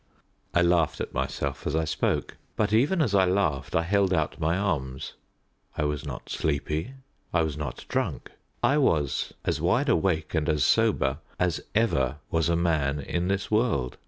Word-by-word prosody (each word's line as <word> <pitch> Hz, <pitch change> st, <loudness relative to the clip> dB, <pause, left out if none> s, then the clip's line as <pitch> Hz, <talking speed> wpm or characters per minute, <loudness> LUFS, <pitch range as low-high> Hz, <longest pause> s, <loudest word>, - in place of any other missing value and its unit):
I 90 Hz, -, +5 dB
laughed 85 Hz, -3 st, +2 dB
at -, -, -4 dB
myself -, -, -3 dB
as 75 Hz, -, -1 dB
I 80 Hz, 0 st, +1 dB
spoke; 80 Hz, -, -1 dB, 0.2 s
but 105 Hz, -1 st, 0 dB
even 150 Hz, +10 st, +3 dB
as 110 Hz, -8 st, -1 dB
I 95 Hz, -1 st, +5 dB
laughed 90 Hz, -8 st, 0 dB
I 85 Hz, -, +3 dB
held 100 Hz, +2 st, +2 dB
out 80 Hz, -4 st, 0 dB
my 85 Hz, +2 st, +1 dB
arms. 70 Hz, -10 st, -2 dB, 0.6 s
I -, -, +1 dB
was 75 Hz, 0 st, -1 dB
not 70 Hz, -4 st, -7 dB
sleepy; 80 Hz, -, -2 dB, 0.4 s
I 85 Hz, -, +2 dB
was 80 Hz, -3 st, -2 dB
not 75 Hz, -1 st, -5 dB
drunk. -, -, -2 dB, 0.3 s
I 145 Hz, +2 st, +4 dB
was 75 Hz, -, +1 dB
as -, -, 0 dB
wide -, -, +2 dB
awake 80 Hz, -3 st, +1 dB
and 80 Hz, -1 st, 0 dB
as 75 Hz, -3 st, +2 dB
sober 65 Hz, +2 st, +2 dB, 0.2 s
as 90 Hz, -2 st, +1 dB
ever 70 Hz, -, +2 dB
was 80 Hz, 0 st, +1 dB
a 85 Hz, -, +3 dB
man 75 Hz, -4 st, +1 dB
in 85 Hz, +5 st, -2 dB
this 100 Hz, +2 st, -1 dB
world. 105 Hz, -, +1 dB
80 Hz, 175 wpm, -27 LUFS, 75-95 Hz, 0.6 s, I